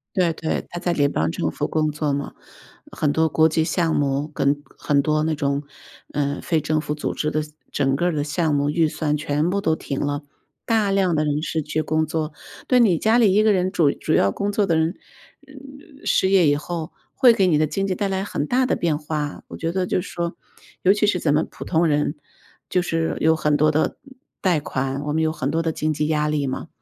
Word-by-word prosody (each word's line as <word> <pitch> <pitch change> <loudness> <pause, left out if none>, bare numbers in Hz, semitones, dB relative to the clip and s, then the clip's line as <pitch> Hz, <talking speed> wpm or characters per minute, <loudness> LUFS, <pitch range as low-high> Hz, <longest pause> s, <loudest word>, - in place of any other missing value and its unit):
对 175 -3 +2
对， 160 0 -3
他 175 - -5
在 175 -1 0
联 145 -3 +2
邦 80 +1 0
政 - - -2
府 - - -3
工 155 -1 +1
作 150 -1 -1
嘛， 140 0 -3 0.6
很 145 -2 0
多 160 +1 +2
国 160 +2 +4
际 160 0 +1
项 165 -1 0
目 140 0 0
跟 145 -1 0
很 140 -1 +1
多 155 +1 +1
那 160 0 0
种 140 0 -1 0.5
呃， 145 -1 -1
非 160 -2 +1
政 155 +1 0
府 150 -1 -3
组 150 - -3
织 150 - -1
的 155 0 0 0.3
整 135 -1 +1
个 175 +5 0
儿 175 - +1
的 145 -1 -1
项 155 0 0
目 145 +1 +1
预 160 0 +2
算 150 -1 -1
全 150 +3 0
部 200 +1 0
都 160 -5 +1
停 135 - -4
了， 145 0 -2 0.4
大 220 -3 +1
量 190 -3 +2
的 155 0 +1
人 150 +1 0
失 160 -1 -2
去 155 +2 -2
工 155 0 0
作。 155 -1 -2 0.3
对， 250 -1 +4
你 185 -8 +4
家 225 +2 +3
里 210 -5 +5
一 210 - +5
个 215 -1 +4
人， 185 -1 +1
主 160 -7 +3
主 155 - -2
要 100 - +4
工 200 0 -2
作 205 -1 +1
的 165 -3 +2
人 160 +3 +1 0.5
呃， 275 +2 -14
失 190 - +3
业 180 -6 +5
以 145 - +3
后 165 +2 -5 0.2
会 245 -2 +6
给 190 -3 +3
你 155 -4 +3
的 155 - +3
经 195 +6 -2
济 185 - -1
带 200 +2 -1
来 190 0 -1
很 150 -7 -3
大 255 +1 +2
的 255 - +1
变 165 -3 0
化。 150 -1 -4
我 - - -8
觉 165 0 -2
得 185 -1 0
就 180 - 0
是 185 - -8
说， 170 0 -3 0.5
尤 190 - +6
其 210 +1 +2
是 185 -3 +1
咱 150 -2 +2
们 155 - +2
普 - - -9
通 170 0 +2
人 150 0 +1 0.5
就 180 - +2
是 165 -2 -1
有 160 0 +4
很 150 -1 +1
多 155 +1 +4
的 155 +1 +2
呃， - - 0 0.5
贷 180 -5 +2
款， 135 -1 -3
我 150 0 -2
们 160 +1 +1
有 160 - +2
很 140 -2 -2
多 165 +2 0
的 165 - 0
经 155 0 -1
济 150 0 -1
压 150 -1 +1
力 150 -2 0
嘛。 130 +5 -4
155 Hz, 260 characters per minute, -22 LUFS, 150-180 Hz, 0.6 s, 会